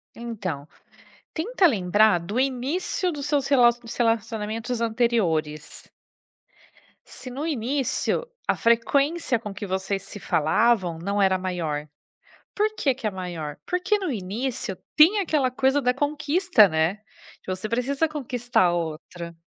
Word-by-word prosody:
Então, 195 -11 -5 0.7
tenta 380 +4 +2
lembrar 205 - +3
do 200 +8 -4
início 275 +8 0
dos 290 -3 -5
seus 285 -3 +1
relacio 240 -3 +5
dos 230 - -8
relacionamentos 225 0 -1
anteriores. 205 -11 -1 1.2
Se 255 - -7
no 275 +5 -4
início, 280 - -1 0.2
a - - +3
frequência 260 +4 +2
com 210 -2 -7
que 205 +1 -6
vocês 190 +1 -2
se 205 0 -8
falavam 175 +2 +2
não 200 +4 -1
era 190 -1 +4
maior. 165 -5 -3 0.7
Por 430 +1 +1
que 275 -9 +1
que 250 -3 -4
é - - -1
maior? 175 -6 -5
Porque, 365 +3 +1
no 375 -6 -2
início, 225 +1 -3 0.2
tem 340 +8 +6
aquela 300 -9 +1
coisa 265 +2 +2
da 250 0 +2
conquista, 290 - +3
né, 160 +3 +1
de 215 +1 -23
você 185 +3 -3
precisa 270 +7 0
conquistar 250 -7 0
a 175 - +2
outra 170 +1 -5
230 Hz, 135 wpm, -25 LUFS, 190-275 Hz, 1.2 s, tem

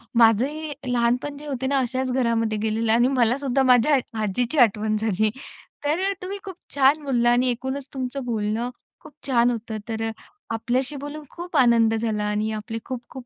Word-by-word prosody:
माझंही 255 +7 +3 0.2
लहानपण 245 +4 0
जे 300 +1 -10
होते 265 -2 -2
ना, 275 +1 +1
अशाच 260 +1 -1
घरामध्ये 230 -3 +1
गेलेलं 220 +1 0
आणि 240 +2 +4
मलासुद्धा 260 +1 +2
आ - - +2
माझ्या 255 +3 +5 0.2
आजीची 235 +7 -1
आठवण 215 +1 -2
झाली. 215 0 +1 0.6
तर 305 +5 +1
अ, - - 0
तुम्ही 380 +2 -5
खूप 380 -2 -7 0.2
छान 285 +2 +4
बोलला 240 -4 +2
आणि 250 +1 +3
ऐकूनच 265 +3 -4
तुमचं 260 0 -4
बोलणं 225 0 -1 0.3
खूप 305 - -14
छान 245 -2 +3
होतं. 225 -1 -4
तर 225 0 -2
अ, - - -3 0.4
आपल्याशी 255 +5 -1
बोलून 290 +2 -7
खूप 350 -2 -5
आनंद 235 -3 +5
झाला 220 -2 -1
आणि 210 +1 -1
आपले 215 +1 -5
खूप-खूप 255 0 -7
245 Hz, 170 wpm, -24 LUFS, 225-275 Hz, 0.6 s, माझ्या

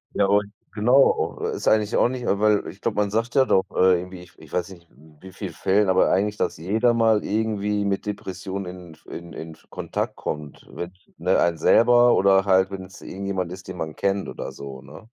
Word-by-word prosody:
Ja 100 - +3
und 100 +1 +1 0.2
genau, 125 +6 +3
oh, - - -3
äh - - -2
ist - - -5
eigentlich 110 0 +2
auch - - +3
nicht 125 -1 -5
weil 105 +1 +2
ich 100 - -10
glaube, 115 - -1
man 100 -1 0
sagt 115 +3 -1
ja 135 -1 +5
doch, 95 - +2
äh, 90 -1 +4
irgendwie 90 0 -9
ich 90 0 -16
ich - - -15
weiß 90 +1 -2
nicht 85 -3 -15
in 75 +4 -21
wie 95 0 -11
viel - - -6
Fällen, 100 +1 +2
aber 95 0 +3
eigentlich, 105 +2 +1
dass - - -1
jeder 110 +8 +1
mal 110 -2 +3
irgendwie 105 -1 -1
mit 100 +1 -2
Depressionen 95 -1 -5
in 90 -2 -12
f - - -23
in 85 0 -9
in 80 0 -8
f - - -18
Kontakt - - -4
kommt, 75 -2 -6
wenn's 90 +1 -7 0.2
ne, - - +2
einen 85 -1 +2
selber 120 +6 +5
oder 95 0 +4
halt 95 0 +3
wenn's 95 -1 -9
irgendjemand 95 -2 -4
ist, 95 0 -10
den 95 -1 -7
man 80 -2 -5
kennt 100 0 -1
oder - - -6
so, 65 -2 -9
ne? 75 - -14
95 Hz, 220 wpm, -23 LUFS, 90-105 Hz, 0.2 s, ja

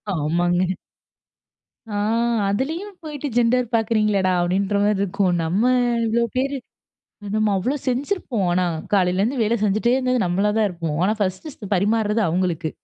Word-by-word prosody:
ஆமாங்க. 175 +4 +1 1.2
அ. - - -6 0.6
அதுலயும் 325 - -3
போயிட்டு 300 -2 -5
ஜெண்டர் 245 0 +2
பாக்குறீங்களேடா, 215 -4 +1
அப்டிங்கற 190 +3 0
மாரிருக்கும். 200 -2 +1
நம்ம 180 +7 0 0.4
இவ்ளோ 230 +1 +1
பேரு 275 +2 0 0.8
நம்ம 215 -1 +2
அவ்ளோ 250 +10 -1
செஞ்சிருப்போம். 255 - -1
ஆனா 180 +1 +2 0.3
காலையில 185 -1 +2
இருந்து 240 +4 0
வேல 220 +2 +1
செஞ்சுட்டே 215 +4 +2
இருந்தது, 255 -3 +1
நம்மளா 195 +4 +1
தான் 220 -1 +3
இருப்போம். 165 -4 -4
ஆனா 210 - +2
1 205 - -4
பரிமாறுறது 210 +3 +1
அவங்களுக்கு. 170 -1 -1
210 Hz, 125 wpm, -22 LUFS, 185-240 Hz, 1.2 s, தான்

